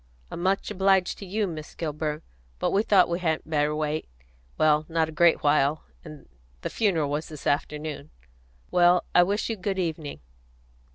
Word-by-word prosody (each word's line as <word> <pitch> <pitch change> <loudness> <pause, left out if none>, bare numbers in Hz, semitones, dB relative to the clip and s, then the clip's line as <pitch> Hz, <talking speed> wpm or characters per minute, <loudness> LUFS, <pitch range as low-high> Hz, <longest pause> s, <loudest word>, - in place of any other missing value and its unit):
"I'm - - -5
much 195 +3 0
obliged 190 -2 +2
to 195 - -8
you, 210 +3 0
Miss 155 -4 -7
Kilburn; 150 -1 -3 0.3
but - - 0
we 200 - +3
thought 200 -4 +4
we 170 +1 -2
hadn't 160 -4 -1
better 150 -1 +1
wait, 155 0 -2 0.5
well 155 -1 +3
not 160 -1 +1
a - - -7
great 170 +1 +3
while, 145 0 +2 0.2
and 155 -3 -12 0.3
the - - -4
funeral 165 -10 +1
was 150 +2 -2
this 155 -3 -10
afternoon. 150 +1 -2 0.6
Well, 175 0 +4
I 180 - +7
wish 200 +4 0
you 225 - -2
good 195 +1 -3
evening." 160 - -3
160 Hz, 170 wpm, -26 LUFS, 150-185 Hz, 0.6 s, I